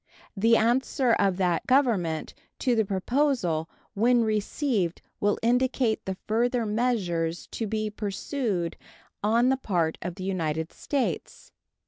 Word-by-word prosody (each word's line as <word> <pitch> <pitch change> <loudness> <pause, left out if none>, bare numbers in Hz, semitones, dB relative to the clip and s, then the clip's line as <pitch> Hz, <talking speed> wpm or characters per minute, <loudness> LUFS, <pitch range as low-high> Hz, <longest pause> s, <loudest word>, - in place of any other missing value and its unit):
The 225 +3 +4
answer 245 +2 +2
of 195 -4 +2
that 180 -3 0
Government 215 - +2 0.2
to 250 -3 +1
the 220 - +3
proposal 195 - 0 0.2
when 235 +3 +3
received 215 - -1 0.2
will 205 0 +2
indicate 245 -1 +1
the 190 -1 -3
further 235 +2 +1
measures 195 -8 0
to 225 - -3
be 215 0 -2
pursued 205 - -2 0.5
on 230 +4 +3
the 265 - +2
part 175 -10 -1
of 175 0 -4
the 185 - -7
United 160 -4 -2
States. 280 -3 -3
215 Hz, 125 wpm, -27 LUFS, 180-245 Hz, 0.5 s, The